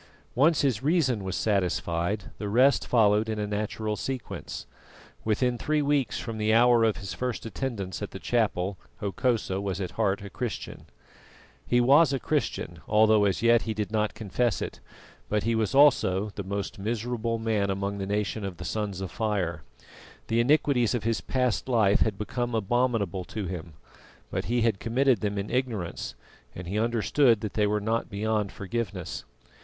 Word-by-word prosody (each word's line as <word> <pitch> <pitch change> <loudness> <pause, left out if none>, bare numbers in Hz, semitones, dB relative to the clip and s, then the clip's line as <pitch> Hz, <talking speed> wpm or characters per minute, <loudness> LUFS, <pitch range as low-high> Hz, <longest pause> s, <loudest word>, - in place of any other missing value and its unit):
Once 150 +5 +4
his 130 -6 +1
reason 135 - +1
was 95 -1 -3
satisfied, 90 -1 -1
the 105 - -3
rest 130 +6 +4
followed 110 -2 +3
in 110 - -2
a 105 - -1
natural 105 +1 -2
sequence. 130 +2 -5 0.6
Within 120 +3 +1
three 150 -1 +1
weeks 140 -6 +1
from 115 -2 -5
the 105 0 +2
hour 120 0 +5
of 110 -2 +2
his 100 -3 -6
first 125 -2 -3
attendance 115 -6 -4
at - - -3
the - - -8
chapel 100 -5 0 0.2
Hokosa 105 -1 -1
was 100 -1 -3
at 95 -3 -3
heart 100 -2 0
a - - -7
Christian. 120 -4 -5 0.8
He 120 - +3
was 140 +5 +6
a 135 - 0
Christian, - - -2
although 110 0 +5
as 100 +2 0
yet 115 0 +5
he 110 -1 -3
did 105 0 -3
not 105 -1 0
confess 110 +1 0
it; - - -5 0.5
but 105 -1 +1
he 115 - +1
was 110 +1 0
also 105 -8 +4
the 100 - -5
most 100 +1 -4
miserable 115 +2 -2
man 110 -3 0
among 100 +1 -2
the 95 - -3
nation 105 +1 -1
of 95 -3 -5
the 90 - -7
Sons 100 -2 -3
of 95 -3 -5
Fire. 95 -8 -1 0.7
The 115 - +2
iniquities 125 -3 +3
of 120 - -2
his 115 0 0
past 125 -1 -1
life 110 -5 +4
had 105 -3 +1
become 120 +3 -2
abominable 110 -4 0
to 105 +1 -5
him; 85 -2 -6 0.6
but - - -2
he 120 +1 +1
had 115 -4 +1
committed 125 0 +2
them 105 -1 -1
in 100 +1 -3
ignorance, 120 -9 -2 0.4
and 90 - -7
he 100 +4 -1
understood 115 +1 +3
that 105 - -4
they 105 -1 +2
were 105 +1 +1
not 110 +3 -1
beyond 105 0 -1
forgiveness. 100 -3 -4
110 Hz, 175 wpm, -27 LUFS, 100-120 Hz, 0.8 s, was